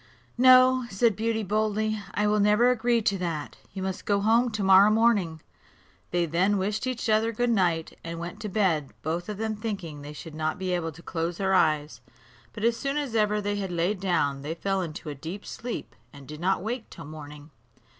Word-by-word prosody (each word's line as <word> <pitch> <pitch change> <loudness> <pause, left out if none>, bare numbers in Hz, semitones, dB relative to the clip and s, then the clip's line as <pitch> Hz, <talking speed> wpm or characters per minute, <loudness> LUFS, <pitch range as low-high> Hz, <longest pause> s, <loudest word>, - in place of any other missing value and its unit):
"No," 255 0 +6
said 210 +2 +2
Beauty 220 +1 -1
boldly, 215 +1 0
"I 210 - +1
will 210 0 +2
never 210 +4 +4
agree 235 -1 +1
to 200 -2 +1
that; 165 -5 -4
you 190 -1 -5
must 190 -1 -4
go 200 -1 +3
home 230 +4 +3
to 215 -2 -3
morrow 195 +2 +7
morning." 210 -8 +2 0.7
They 175 -1 +1
then 180 +6 +1
wished 210 +5 -1
each 250 -2 -3
other 220 +1 +2
good 245 +2 0
night, 175 -6 +1
and 165 0 -5
went 175 +4 -6
to 215 -2 -5
bed, 180 -8 0
both 170 +5 -3
of 210 - -4
them 220 0 -2
thinking 195 -9 -5
they 145 +1 -8
should 160 +1 -9
not 155 0 -2
be 185 0 -3
able 165 -2 -1
to 165 +2 -15
close 170 0 -3
their 190 -1 0
eyes; 150 -8 +1 0.5
but 210 - -8
as 230 0 +2
soon 275 +1 -2
as 285 -5 -2
ever 210 -1 +2
they 205 0 -2
had 195 -2 -3
laid 175 +4 0
down, 145 -7 0
they 155 +3 -4
fell 195 +2 -1
into 160 -1 -6
a - - -4
deep 165 +8 -7
sleep, 235 - -6 0.2
and 140 -2 -13
did 150 0 -8
not 185 +1 0
wake 230 +2 -4
till - - -10
morning. 150 0 -10
195 Hz, 205 wpm, -27 LUFS, 165-220 Hz, 0.7 s, morrow